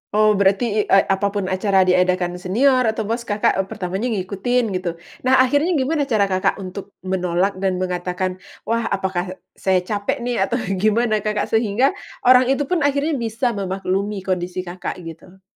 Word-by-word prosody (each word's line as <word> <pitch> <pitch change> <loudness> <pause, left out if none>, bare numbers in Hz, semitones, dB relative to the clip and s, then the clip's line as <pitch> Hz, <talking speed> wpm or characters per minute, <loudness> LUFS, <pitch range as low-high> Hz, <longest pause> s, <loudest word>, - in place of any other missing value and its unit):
Oh 215 0 +5
berarti 200 +4 +3
i - - +5
e 195 - +6
apa 195 +1 0
pun 200 - 0
acara 190 0 +3
diadakan 180 -1 +1
senior 250 +7 +2
atau 220 0 -1
bos 230 +3 -3
Kakak, 205 -2 +1
eee, 190 - 0
pertamanya 190 +4 -3
ngikutin 215 +3 -1
gitu. 180 -2 -3 0.3
Nah 260 - +5
akhirnya 290 +7 +1
gimana 290 +1 0
cara 205 -6 +1
Kakak 185 0 +1
untuk 190 +2 -8
menolak 185 +1 0
dan 190 -1 0
mengatakan, 180 0 -2 0.2
wah 230 0 -1
apakah 185 -1 -2 0.2
saya 185 -1 +2
capek 205 +4 -2
nih 245 -1 -1
atau - - -1 0.2
gimana 215 +2 +2
Kakak, 210 0 -2
sehingga 225 +3 +2 0.3
orang 255 0 +6
itu 270 +2 +1
pun 345 +5 0
akhirnya 285 +1 0
bisa 230 +2 -1
memaklumi 195 0 -2
kondisi 180 -1 -2
Kakak 180 0 -5
gitu? 175 +3 -12
200 Hz, 165 wpm, -21 LUFS, 185-235 Hz, 0.3 s, e